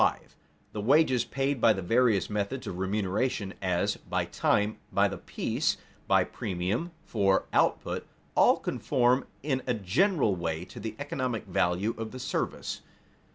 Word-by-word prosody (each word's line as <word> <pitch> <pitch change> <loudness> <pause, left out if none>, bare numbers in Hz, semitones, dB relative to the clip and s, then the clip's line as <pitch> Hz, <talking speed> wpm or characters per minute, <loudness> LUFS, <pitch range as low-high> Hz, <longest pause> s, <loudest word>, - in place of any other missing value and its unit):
_The 105 - -3
wages 130 -1 +4
paid 135 -2 -1
by 115 - +6
the 95 -2 -4
various 115 -2 +3
methods 105 +5 -2
of 90 - -5
remuneration 100 +2 -1
as, 90 -2 0
by - - -2
time, 105 +1 +1
by - - +4
the - - -6
piece, - - -1 0.3
by - - +5
premium 95 - -2 0.2
for 95 -3 +2
output - - +1 0.3
all - - +5
conform 125 +2 +1 0.2
in 135 -3 0
a 125 - +1
general 120 - +2
way 85 -1 -3
to - - -11
the 110 +1 -5
economic 130 -5 -3
value 90 +3 +1
of 115 -1 -3
the 130 - -6
service. 130 - -3
110 Hz, 145 wpm, -29 LUFS, 95-130 Hz, 0.3 s, by